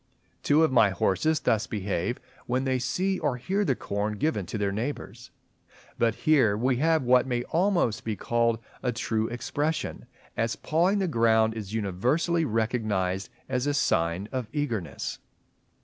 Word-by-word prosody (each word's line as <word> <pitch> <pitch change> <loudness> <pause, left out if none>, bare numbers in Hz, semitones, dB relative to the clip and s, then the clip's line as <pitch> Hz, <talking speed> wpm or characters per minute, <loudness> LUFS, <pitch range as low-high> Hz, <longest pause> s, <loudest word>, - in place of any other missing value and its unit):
Two 150 +2 +4
of 160 - +3
my 115 -5 +5
horses 95 - +1
thus 110 0 +1
behave 100 +1 -2 0.3
when 125 +2 0
they 130 -1 0
see 185 +10 -1
or 125 - 0
hear 190 +12 -1
the 135 -9 +1
corn 105 0 -2
given 105 - -1
to - - -4
their 100 -1 0
neighbours. 120 +8 -5 0.7
But 115 -2 +2
here 130 -10 +4
we 125 +2 +1
have 160 +1 +2
what 125 +1 +4
may 120 -1 -1
almost 170 - +1
be 110 -2 -2
called 115 +3 +1 0.2
a 125 - 0
true 110 -1 -1
expression, 145 +6 -3 0.3
as 115 0 0
pawing 175 +6 +1
the 195 -2 0
ground 110 -5 +3
is 110 -1 -6
universally 125 - +1
recognized 110 -5 -1 0.2
as 125 +2 -1
a 145 - +1
sign 85 -6 +1
of 130 -4 -3
eagerness. 120 - -3
120 Hz, 155 wpm, -27 LUFS, 105-145 Hz, 0.7 s, my